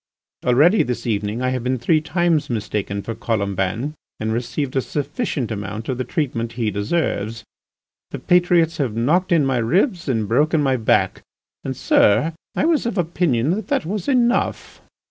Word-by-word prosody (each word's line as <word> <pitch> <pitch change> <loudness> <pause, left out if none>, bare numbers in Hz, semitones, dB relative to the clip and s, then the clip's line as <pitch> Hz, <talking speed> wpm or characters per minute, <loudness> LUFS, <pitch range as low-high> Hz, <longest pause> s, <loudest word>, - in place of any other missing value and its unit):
Already 150 - +4
this 125 -1 -3
evening 105 +1 -1
I 130 - +1
have 130 -2 -2
been 130 +1 0
three 155 +6 +2
times 160 -1 0
mistaken 105 -3 -3
for 115 - -4
Colomban 105 +4 -2 0.3
and 110 0 -1
received 130 +4 -3
a 135 - +3
sufficient 145 - -3
amount 105 +2 -5
of 130 -1 -2
the - - 0
treatment 125 -7 -2
he 115 -3 -1
deserves. 110 - -2 0.7
The - - -5
patriots 175 -2 +3
have 130 -7 -1
knocked 155 +12 +1
in 160 -4 +4
my 135 -2 +1
ribs 175 - +1
and 110 -5 0
broken 150 +8 +2
my 135 -2 +2
back, 115 -3 +1 0.4
and, - - -4
sir, 155 +11 +3 0.2
I - - +1
was 320 -7 +2
of 225 - -3
opinion 165 -6 +1
that 210 +5 -2
that 280 - 0
was 190 +1 -3
enough." 245 -3 0
130 Hz, 165 wpm, -21 LUFS, 115-170 Hz, 0.7 s, Already